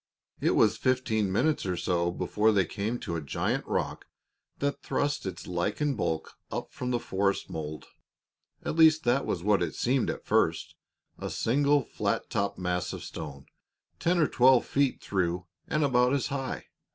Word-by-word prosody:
It - - +2
was - - +4
fifteen 115 -6 +1
minutes 155 +10 +1
or 90 -2 -2
so 85 0 +1
before 105 +4 +1
they 100 -3 +3
came 110 +6 -2
to 85 - -3
a 80 - -2
giant 70 - -2
rock - - -2 0.5
that 140 0 -2
thrust 145 -7 -1
its 90 -2 -6
lichened 105 +11 -1
bulk 80 -7 -2 0.2
up - - -4
from 125 - -4
the 120 -1 +1
forest 100 -2 -1
mold. 75 -2 -5 0.8
At - - -2
least 160 -1 +6
that 125 +3 +2
was 85 - -2
what 105 -1 +3
it 85 -3 -2
seemed 130 +1 +1
at - - -4
first - - +1 0.5
a - - -4
single, 140 +4 +2
flat - - -2
topped 100 0 -1
mass 90 -1 -2
of - - -6
stone, 70 -3 -7 0.5
ten 175 +2 +2
or 160 - +4
twelve 130 0 +5
feet 140 -1 +1
through 90 -2 -1 0.2
and 155 - +1
about 125 -2 +3
as 140 - +1
high. 135 -1 -3
110 Hz, 170 wpm, -28 LUFS, 90-135 Hz, 0.8 s, least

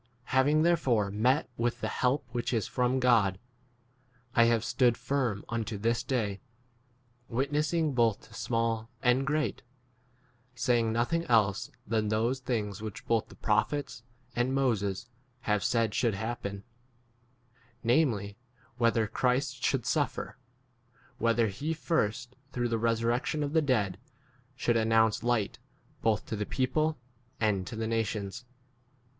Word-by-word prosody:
Having 145 +4 +4
there 170 0 +4
fore 110 -9 +1
met 125 +8 +2
with 120 +1 0
[the] - - -1
help 130 +3 0
which 120 +1 -2
is 110 - 0
from 125 +1 +1
God, 115 -7 +3 1.0
I 120 - +6
have 115 -1 +2
stood 120 -3 +3
firm 125 -8 -1
unto 115 -2 -3
this 115 +3 +1
day, 115 -6 -2 0.9
witnessing 150 +5 0
both 115 -4 +2
to - - -18
small 115 -1 -1
and 130 +2 +3
great, 155 0 0 0.9
saying 120 -2 +2
nothing 120 +9 +1
else 105 -5 +2 0.2
than 110 0 0
those 115 +5 +1
things 110 -5 -2
which 110 -3 -7
both 115 -1 +1
the - - -14
prophets 115 +4 0 0.3
and 125 +2 +1
Moses 110 -6 0 0.3
have 105 -2 0
said 115 -3 +2
23 - - -7
should 115 -3 +2
happen, 100 -2 -4 1.2
[namely] 115 -6 +1 0.4
whether 115 -2 +3
Christ 125 +3 0
should 130 -4 +1
suffer; 130 -1 -1 0.8
whether 115 0 +3
he 140 +11 -2
first, 125 -6 -1 0.2
through 120 -2 -1
resurrection 115 +6 0
of 145 0 -3
[the] 160 - +4
dead, 105 - 0 0.6
should 120 -3 +1
announce 110 -1 +3
light 120 -4 0 0.4
both 110 -2 +2
n - - -29
to - - -2
the 105 - -3
people 155 +4 0 0.4
and 100 -4 +1
to - - -6
the 110 0 -2
nations. 110 0 -2
115 Hz, 135 wpm, -30 LUFS, 110-130 Hz, 1.2 s, I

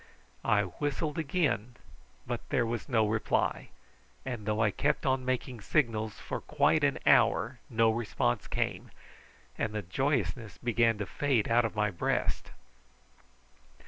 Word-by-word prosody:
I 105 -1 +3
whistled 145 - -3
again, 140 - 0 0.5
but - - -5
there 120 - +2
was 115 +4 -4
no 110 -4 +3
reply; 110 +1 0 0.6
and 120 -5 -5
though 105 0 0
I 110 -2 +3
kept 145 +8 0
on 130 -1 +1
making 130 -2 -2
signals 110 -4 0
for - - -5
quite - - +2
an - - +2
hour 120 +1 +4
no 115 -2 +3
response 110 - -1
came, - - -2 0.7
and 110 -2 -1
the 105 - -2
joyousness 110 - -1
began 115 -1 +2
to 105 - -3
fade 130 +1 0
out 120 0 +4
of 110 - -3
my 105 -1 +1
breast. 85 - -1
115 Hz, 140 wpm, -30 LUFS, 105-130 Hz, 0.7 s, hour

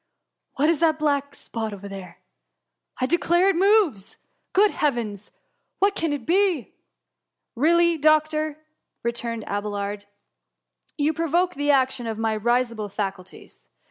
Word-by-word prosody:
^ - - -51 0.5
What 290 - +2
is 330 -2 +2
that 320 -2 +3
black 285 -2 0
spot 220 -2 -5
tliere? 195 -2 -9 0.8
I 255 - +1
declare 345 +5 +3
it 390 - +2
moves! 375 - +2 0.3
Good 405 +1 +4
heavens! 225 -8 -2 0.5
what 400 +1 +3
can 330 -5 -1
it 285 -5 -4
be 365 - +1 0.4
?" - - -59
Really, 340 0 +4
doctor 310 0 +2
!^ - - -26 0.5
returned 235 -1 -3
Abelard, 205 0 -4 0.4
*' - - -38
you 300 +1 +1
THE - - -20
HUM - - +1
MY. 315 - -5
47 - - -12
proToke - - -15
the 290 +1 +1
action 260 -3 +1
of 220 -1 -3
my 225 0 0
risible 230 -1 0
faculties. 190 -2 -7
275 Hz, 155 wpm, -24 LUFS, 215-325 Hz, 0.8 s, Good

